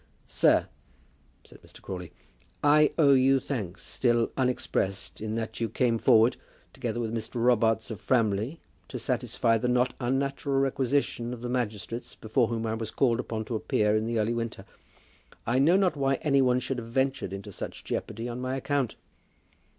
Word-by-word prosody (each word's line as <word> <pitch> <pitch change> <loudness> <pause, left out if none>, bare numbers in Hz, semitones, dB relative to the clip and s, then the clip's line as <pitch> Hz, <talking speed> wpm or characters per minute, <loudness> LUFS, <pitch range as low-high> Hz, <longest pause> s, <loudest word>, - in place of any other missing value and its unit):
"Sir," - - +3 0.8
said - - -16
Mr. - - -16
Crawley, 90 -3 -7 0.5
"I 150 +1 +5
owe 145 -4 +6
you 135 +1 +4
thanks, 105 -10 -5
still 120 -2 +1
unexpressed, 125 -8 -1
in 110 0 -3
that 115 0 -4
you 115 - 0
came 115 +1 +1
forward, 115 -1 +5 0.4
together 120 - -3
with 115 -1 -2
Mr. 115 +1 -4
Robarts 115 -2 +2
of 105 - -7
Framley, 115 +4 +1 0.3
to - - -6
satisfy 115 -1 0
the 125 - -1
not 125 0 +2
unnatural 135 +3 -1
requisition 135 -2 0
of 120 - -12
the 120 - -3
magistrates 115 -2 -3
before 110 +2 +1
whom 115 -1 -2
I 110 - -1
was 110 -1 -4
called 120 -1 +1
upon 110 -3 -3
to 115 - -3
appear 105 -1 +1
in 110 +1 0
the 115 0 -1
early 110 +2 +1
winter. 115 -1 -4 0.8
I 120 +3 +2
know 165 +7 +5
not 190 -4 +2
why 135 -1 +1
any 140 -3 +3
one 125 -1 +3
should 130 -1 -3
have 115 - -8
ventured 130 -4 0
into 100 0 -7
such - - -7
jeopardy 115 +2 -4
on 120 +1 -5
my 130 +1 -2
account." 135 -3 -1
120 Hz, 175 wpm, -28 LUFS, 110-135 Hz, 0.8 s, owe